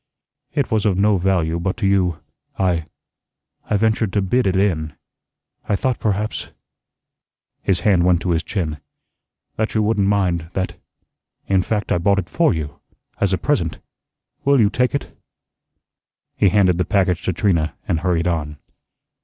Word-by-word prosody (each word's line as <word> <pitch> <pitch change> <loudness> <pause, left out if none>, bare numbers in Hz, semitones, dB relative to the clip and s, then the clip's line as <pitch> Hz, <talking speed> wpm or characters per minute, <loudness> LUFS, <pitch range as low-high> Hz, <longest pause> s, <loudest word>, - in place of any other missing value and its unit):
It 140 -3 0
was 110 -1 +2
of 95 -3 +1
no 100 0 +3
value 85 -3 +1
but 95 +4 -2
to 115 - -2
you. 90 -5 +1 0.4
I 85 -4 0 0.8
I 105 - +2
ventured 110 -1 +1
to 105 - +2
bid 120 +5 +1
it 95 - +1
in. 80 -6 0 0.7
I 105 - +3
thought 125 +4 -1
perhaps" 105 0 -2 1.1
his 90 -3 0
hand 95 -3 +3
went 90 -1 +3
to 90 - 0
his 80 -1 +1
chin, 80 -5 -3 0.8
"that 110 +1 -1
you 110 - +3
wouldn't 105 -2 +1
mind; 90 -5 0
that 95 -1 -2 0.7
in 95 -1 +2
fact, 105 +2 -2
I 90 - +2
bought 100 +3 +2
it 95 -3 -2
for 165 -1 +2
you 75 -4 -4 0.4
as 100 - +1
a 95 - +2
present. 90 - 0 0.7
Will 140 -1 +4
you 105 -2 +4
take 125 +3 +1
it?" 140 - -5 1.2
He 100 - +4
handed 90 -2 +3
the - - +3
package 90 -1 +1
to - - +1
Trina 85 -4 +1
and 80 - +1
hurried 85 -1 0
on. 75 -4 -2
95 Hz, 160 wpm, -20 LUFS, 85-105 Hz, 1.2 s, Will